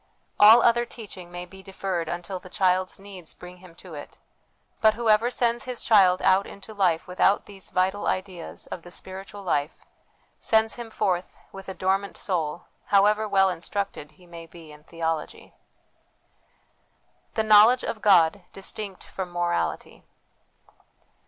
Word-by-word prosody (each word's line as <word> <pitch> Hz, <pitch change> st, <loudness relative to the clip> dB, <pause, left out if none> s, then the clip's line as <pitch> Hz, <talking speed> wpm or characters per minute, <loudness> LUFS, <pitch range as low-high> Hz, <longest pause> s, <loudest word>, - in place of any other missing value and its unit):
All 220 Hz, +3 st, +8 dB
other 240 Hz, 0 st, +4 dB
teaching 200 Hz, -7 st, -10 dB
may 175 Hz, 0 st, -6 dB
be 190 Hz, +2 st, -14 dB
deferred 190 Hz, -3 st, -4 dB
until 175 Hz, +2 st, -5 dB
the 185 Hz, -, -14 dB
child's 185 Hz, 0 st, 0 dB
needs 195 Hz, -4 st, -11 dB
bring 180 Hz, 0 st, -12 dB
him 180 Hz, -2 st, -16 dB
to 180 Hz, -1 st, -12 dB
it; 145 Hz, -1 st, -10 dB, 0.6 s
but 220 Hz, -1 st, +5 dB
whoever 225 Hz, 0 st, +3 dB
sends 240 Hz, -1 st, 0 dB
his 250 Hz, -2 st, -4 dB
child 190 Hz, -4 st, +4 dB
out 190 Hz, +1 st, +3 dB
into 200 Hz, +2 st, -11 dB
life 180 Hz, -5 st, +1 dB
without 185 Hz, +2 st, +2 dB
these 195 Hz, -2 st, -13 dB
vital 190 Hz, +3 st, 0 dB
ideas 185 Hz, -3 st, -4 dB
of 175 Hz, -, -7 dB
the 175 Hz, -, -13 dB
spiritual 195 Hz, +3 st, -9 dB
life, 150 Hz, -4 st, -2 dB, 0.5 s
sends 220 Hz, 0 st, +2 dB
him 240 Hz, -2 st, -8 dB
forth 185 Hz, -4 st, -2 dB
with 195 Hz, 0 st, -10 dB
a 190 Hz, -, -6 dB
dormant 195 Hz, +1 st, -1 dB
soul, 170 Hz, -3 st, -2 dB, 0.2 s
however 210 Hz, +2 st, +3 dB
well 195 Hz, -1 st, +4 dB
instructed 180 Hz, -4 st, -5 dB
he 180 Hz, +4 st, -21 dB
may 170 Hz, -1 st, -11 dB
be 165 Hz, -2 st, -14 dB
in 150 Hz, 0 st, -15 dB
theology. 165 Hz, -2 st, -4 dB, 1.8 s
The 220 Hz, -, +1 dB
Knowledge 215 Hz, +4 st, +6 dB
of 215 Hz, -, -4 dB
God 185 Hz, -2 st, +4 dB
distinct 195 Hz, 0 st, -5 dB
from 190 Hz, -2 st, -6 dB
Moral 175 Hz, 0 st, 0 dB
ity. -, -, -12 dB
190 Hz, 150 wpm, -25 LUFS, 175-205 Hz, 1.8 s, All